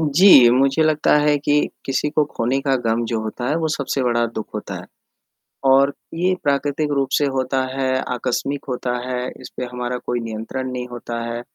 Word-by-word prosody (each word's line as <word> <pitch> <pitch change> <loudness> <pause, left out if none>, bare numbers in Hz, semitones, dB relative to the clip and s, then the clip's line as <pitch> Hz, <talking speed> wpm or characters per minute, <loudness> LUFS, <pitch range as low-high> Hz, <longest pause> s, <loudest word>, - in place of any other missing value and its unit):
जी, 150 -4 +7
मुझे 135 +5 +3
लगता 155 -1 +3
है 150 0 +3
कि 145 +1 +1 0.2
किसी 135 +2 0
को 155 0 +2
खोने 125 -2 -1
का 135 -1 +1
गम 115 +1 +1
जो 115 -1 -1
होता 120 +3 -4
है, 150 - +1
वो 160 -1 0
सबसे 140 -3 -1
बड़ा 120 -1 +2
दुःख 110 -1 -6
होता - - -5
है, - - -7 0.8
और 135 +1 +4 0.2
ये 180 +3 +1
प्राकृतिक 145 +1 0
रूप 135 -1 0
से 145 - +2
होता 130 0 0
है, 135 -1 0 0.3
आकस्मिक 130 +3 -2
होता 125 -1 -2
है, 125 0 -2
इस 125 - -9
पे 125 - -2
हमारा 125 0 -3
कोई 120 0 -3
नियंत्रण 115 +4 -5
नहीं 125 -1 -4
होता 120 -1 -5
है, 115 0 -4
130 Hz, 190 wpm, -21 LUFS, 120-145 Hz, 0.8 s, जी